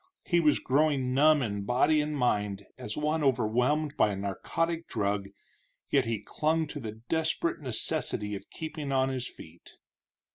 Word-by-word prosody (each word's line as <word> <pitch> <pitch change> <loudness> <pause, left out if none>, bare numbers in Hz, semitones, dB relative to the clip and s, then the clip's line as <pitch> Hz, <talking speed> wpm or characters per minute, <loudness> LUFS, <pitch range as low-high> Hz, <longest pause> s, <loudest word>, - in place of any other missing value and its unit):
He 175 - +3
was 155 -3 +4
growing 135 -2 +1
numb 150 +1 +5
in 100 -3 -3
body 130 +7 +3
and 150 0 -2
mind, 105 -6 0
as 105 - -6
one 150 +1 0
overwhelmed 130 +4 +1
by 105 - +4
a - - -3
narcotic 165 - -2
drug, 100 -2 -1 0.6
yet - - +3
he 115 -2 -2
clung 160 +1 0
to 145 - -6
the 110 -5 -5
desperate 160 0 0
necessity 125 -4 -1
of 100 - -7
keeping 155 -3 -5
on 135 0 +2
his 130 -2 -3
feet. 80 +2 -14
135 Hz, 155 wpm, -29 LUFS, 105-155 Hz, 0.6 s, numb